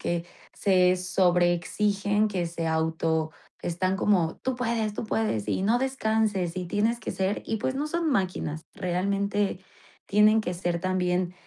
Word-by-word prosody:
que 170 0 -1 0.3
se 185 -2 +3
sobre 180 -1 +2
exigen, 205 +3 0
que 185 -4 -2
se 165 0 -4
auto 160 0 0 0.3
están 185 +2 0
como: 185 -5 +2
"¡Tú 260 -1 -1
puedes, 225 -3 -1
tú - - -4
puedes! 215 - -1
Y - - 0
no 225 +5 +3
descanses 220 -8 0
y 185 - -2
tienes 215 +6 +1
que - - -4
ser" 190 +2 -1
Y 225 - -1
pues, 260 +5 -1
no 290 +2 -1
son 335 +1 -1
máquinas 180 - -1
realmente, 200 +2 -1 0.5
tienen 210 +2 +5
que 180 - -3
ser 175 -1 -2
también, 180 -1 0
190 Hz, 155 wpm, -27 LUFS, 175-215 Hz, 0.5 s, tienen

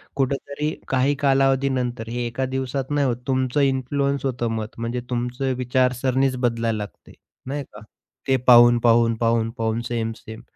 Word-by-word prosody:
कुठेतरी 140 +2 -2 0.2
काही 135 +2 +1
कालावधीनंतर 135 -4 +1
हे 120 +1 -3
एका 120 +3 -2
दिवसात 130 +1 -3
नाही 145 -1 +2
होत. 120 -2 -1
तुमचं 130 +1 +1
इन्फ्लुअन्स 140 +1 0
होतं 125 -3 -1
मत. 110 -1 -3
म्हणजे 115 +2 -3
तुमचं 125 +2 -2
विचार 125 0 +1
सरणीच 130 0 +1
बदलायला 115 -2 0
लागते, 105 -1 -9 0.3
नाही 140 +2 -4
का. 105 - -11 0.5
ते 135 - +3
पाहून-पाहून, 120 -1 +6
पाहून-पाहून, 115 -1 0
सेम-सेम. 115 -1 -5
125 Hz, 135 wpm, -22 LUFS, 115-135 Hz, 0.5 s, पाहून-पाहून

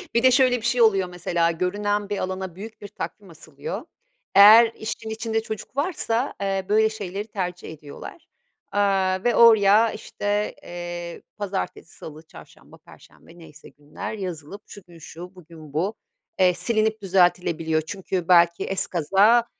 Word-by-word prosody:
Bir 235 - +3
de 260 - +6
şöyle 255 -1 +4
bir 230 - -8
şey 240 0 +2
oluyor 195 -5 +3
mesela, 170 -1 0
görünen 205 +4 -2
bir 205 - -2
alana 185 -2 -4
büyük 215 +4 -10
bir 205 - -8
takvim 200 0 -8
asılıyor. 170 - -8 0.5
Eğer 220 +3 +9
işin 220 0 -6
içinde 225 0 -2
çocuk 220 +2 -8
varsa, 280 -6 -1
eee, 195 -1 -1
böyle 220 +1 +3
şeyleri 205 -1 -6
tercih 180 -5 -5
ediyorlar, 150 - -11 0.5
aaa, 195 -2 +1
ve 240 -1 +2
oraya, 220 -1 +6
işte, 205 +1 -3
eee, 175 -1 -7 0.2
pazartesi, 195 -4 -5
salı, 155 0 -10
çarşamba, - - -16
perşembe 170 - -19
neyse 160 -2 -14
günler, 145 +7 -8
yazılıp 185 -1 -7
şu 205 - -12
gün 170 -1 -16
şu, 180 +4 -11
bugün 160 -4 -14
bu. 190 +8 -1 0.4
Eee, 180 -1 +4
silinip 215 +4 0
düzeltilebiliyor 175 -4 +1
çünkü 185 0 -4
belki 170 -1 +4
ezkaza 195 +5 +2
195 Hz, 145 wpm, -23 LUFS, 175-220 Hz, 0.5 s, Eğer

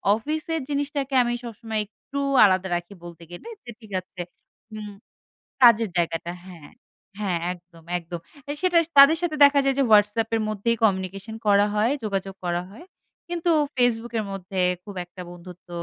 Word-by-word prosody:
অফিসের 310 +7 -3
জিনিসটাকে 285 -1 -2
আমি 240 0 -1
সবসময় 225 -1 -5
একটু 250 +6 -11 0.3
আলাদা 190 -1 +2
রাখি 175 +3 -5
বলতে 170 -1 -11
গেলে। 175 - -10 0.2
যে - - -12
ঠিক 220 -3 -15
আছে। 185 0 -19 0.5
হুম। 210 -1 -7 0.7
কাজের 230 -2 +6
জায়গাটা 170 0 -1
হ্যাঁ, 170 -6 -12 0.5
হ্যাঁ। 190 -4 0 0.2
একদম, 175 -2 -18
একদম। 170 0 -7 0.3
এ - - 0
সেটা 365 -2 +3 0.2
তাদের 280 +4 +9
সাথে 345 -3 -1
দেখা 280 0 +4
যায় 270 -1 +2
যে - - +4
Whatsapp 210 +1 +4
এর 225 - 0
মধ্যেই 215 +2 0
কমিউনিকেশন 195 +1 -1
করা 205 0 +5
হয়, 215 +4 +2
যোগাযোগ 195 -2 -3
করা 175 0 0
হয়। 255 - -13 0.4
কিন্তু 345 0 -1 0.3
Facebook 240 -2 +1
এর 215 - -3
মধ্যে 190 0 -5 0.2
খুব 205 0 -10
একটা 175 +1 -12
বন্ধুত্ব 175 0 -13
210 Hz, 160 wpm, -24 LUFS, 185-245 Hz, 0.7 s, তাদের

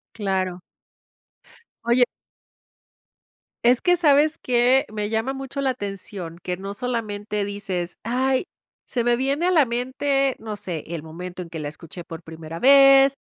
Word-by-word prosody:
Claro. 190 -4 -1 1.2
Oye. 240 +1 +5 1.6
Es 245 +1 +4
que, 355 0 +4
sabes 300 -1 +4
que, 250 +2 +3
me 210 0 -3
llama 225 +5 -1
mucho 270 +1 -5
la 270 -1 +1
atención 195 -6 -6
que 180 -1 -3
no 195 +2 -6
solamente 210 -3 -3
dices: 190 -4 -4
“Ay, 260 +5 +1 0.4
se 240 -2 -1
me 240 0 +3
viene 280 +7 0
a - - +3
la 310 -7 +5
mente, 265 +3 0
no 215 -2 -6
sé, 180 -6 -5
el 165 -2 -5
momento 180 +3 -7
en 165 - -10
que 160 - -6
la 145 -1 -4
escuché 165 +3 -8
por 165 0 -9
primera 160 0 -8
vez, 275 0 +7
225 Hz, 150 wpm, -23 LUFS, 180-265 Hz, 1.6 s, vez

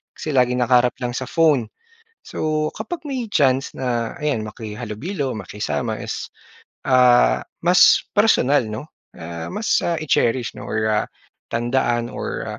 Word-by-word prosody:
kasi 155 - -5
laging 125 -1 +2
nakaharap 125 0 +3
lang 120 - -1
sa 130 0 -4
phone. 150 -6 +2 0.6
So, 155 0 -1
kapag 350 -2 -5
may 265 -5 -3
chance 135 -3 +2
na, 120 -3 -2
ayan 130 -8 -1
makihalubilo, 120 - -5
makisama, 100 -7 -3
is - - -5 0.6
ah, 125 -2 +5 0.2
mas 180 +1 +6
personal 145 - +3
'no, 110 +8 -7 0.3
ah, 85 0 -6
mas, 215 +2 +1
ah, 170 - +1
i-cherish 125 -5 +1
'no - - -8
or 110 0 -1
ah, 105 - 0 0.5
tandaan 120 0 0
or - - -4
125 Hz, 135 wpm, -21 LUFS, 115-155 Hz, 0.6 s, mas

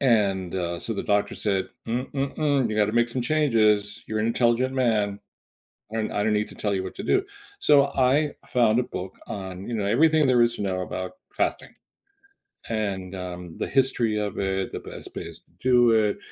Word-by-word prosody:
And, 100 -8 +2
uh, 85 -2 -2
so 115 - -3
the 100 - -3
doctor 105 0 +1
said, 100 -3 -1 0.2
"Mm-mm-mm, 135 +2 0
you 105 - -2
gotta 105 0 +2
make 120 +1 +3
some 125 - -2
changes. 110 -7 +2
You're 110 - -2
an 110 - +1
intelligent 120 +2 +2
man, 105 -6 +1 0.7
and 110 -1 -2
I 105 - -1
don't 110 0 +2
need 105 0 0
to - - -13
tell 105 -1 -1
you 95 - -1
what 95 - -7
to - - -6
do," 390 - +2 0.3
so 145 -2 +5
I 140 +3 +2
found 120 -2 +3
a - - +1
book 95 -5 -7
on, 95 -1 -6
you - - -3
know, 105 -2 -1
everything 155 +7 +4
there 125 -2 +4
is 120 0 +3
to - - -6
know 95 -2 -1
about 95 0 -5 0.2
fasting - - -2 1.0
and, 100 -4 -2
um, 90 -2 -7
the - - -1
history 125 -5 +1
of 105 -1 -3
it, 95 -1 -1
the - - -5
best - - -9
bays - - -7
to - - -37
do 125 -2 +4
it, 110 -2 +2
110 Hz, 195 wpm, -25 LUFS, 100-125 Hz, 1.0 s, so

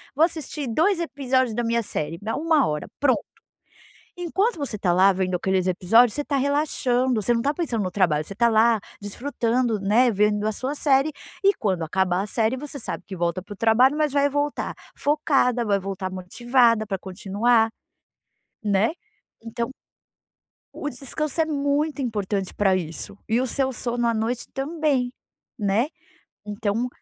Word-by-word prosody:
Vou 310 - +4
assistir 305 -4 -5
2 335 - +2
episódios 260 -7 0
da 240 - -1
minha 235 0 +1
série. 165 -5 -4
Dá 220 +2 -3
1 315 -2 +2
hora, 150 0 -3
pronto". 280 -3 +3 1.0
Enquanto 385 +6 0
você 280 -8 -4
está 180 -3 +1
lá 190 +2 +6
vendo 185 -1 -1
aqueles 190 0 0
episódios, 210 +6 +4
você 295 - -2
está 285 -1 -1
relaxando, 260 -4 +1
você 240 +4 +2
não 230 - 0
está 285 +4 +1
pensando 265 - -2
no 185 - -3
trabalho, 170 -6 +2
você 195 - -13
está 235 +4 +3
lá 225 0 +4 0.2
desfrutando, 235 +1 -1
né, 225 +6 +4
vendo 210 0 +1
a 215 - 0
sua 260 +7 -3
série, 285 0 +2 0.3
e 395 - +5
quando 190 - -1
acabar 180 +2 0
a 200 - -4
série, 225 +3 0
você 285 +1 -7
sabe - - -5
que - - -9
volta 170 0 -1
para 195 - -18
o - - -12
trabalho, 245 +6 +4
mas 300 -2 +1
vai 285 0 +3
voltar 290 +1 -2 0.2
focada, 275 -5 +1
vai 200 -2 +2
voltar 190 0 -4
motivada 230 +4 +2
para 195 - -2
continuar, 205 +5 +1 0.9
né? 205 +1 +2 0.5
Então 235 +1 -4 1.0
o 295 - -4
descanso 295 +4 -3
é - - +2
muito 285 0 0
importante 205 -5 -2
pra 195 -2 +2
isso. 175 +3 -4
E 230 +2 +2
o 260 - -1
seu 265 +2 0
sono 240 0 -1
à 230 - +2
noite 225 +2 -2
também, 275 -3 0 0.5
né? 210 +4 +1 0.6
Então 210 +3 -1
235 Hz, 165 wpm, -24 LUFS, 200-280 Hz, 1.0 s, lá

